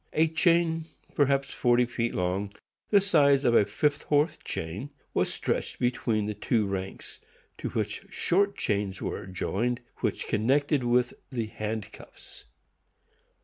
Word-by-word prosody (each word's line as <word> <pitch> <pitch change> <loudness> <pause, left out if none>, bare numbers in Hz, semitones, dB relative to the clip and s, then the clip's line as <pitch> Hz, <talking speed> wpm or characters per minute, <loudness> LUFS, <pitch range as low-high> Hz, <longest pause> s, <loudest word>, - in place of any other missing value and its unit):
A 160 +1 +4
chain 165 0 +2 0.3
perhaps 140 -1 +2
forty 120 0 +3
feet 120 -1 -2
long, 95 +3 -1 0.3
the 205 - +6
size 145 -8 +4
of 120 - +4
a 105 - +6
fifth 145 +8 0
horse 150 +3 +2
chain, 90 - -4 0.2
was - - +1
stretched - - -2
between 120 -3 0
the 105 - -2
two 105 +1 0
ranks, 95 -1 -5 0.4
to - - -3
which - - -3
short 200 +3 +1
chains 100 -2 -1
were - - -4
joined, 115 +6 -1 0.2
which - - -2
connected 140 +5 +2
with 120 0 +2 0.2
the 120 -4 -2
handcuffs. 110 0 -7
120 Hz, 135 wpm, -28 LUFS, 105-145 Hz, 0.4 s, the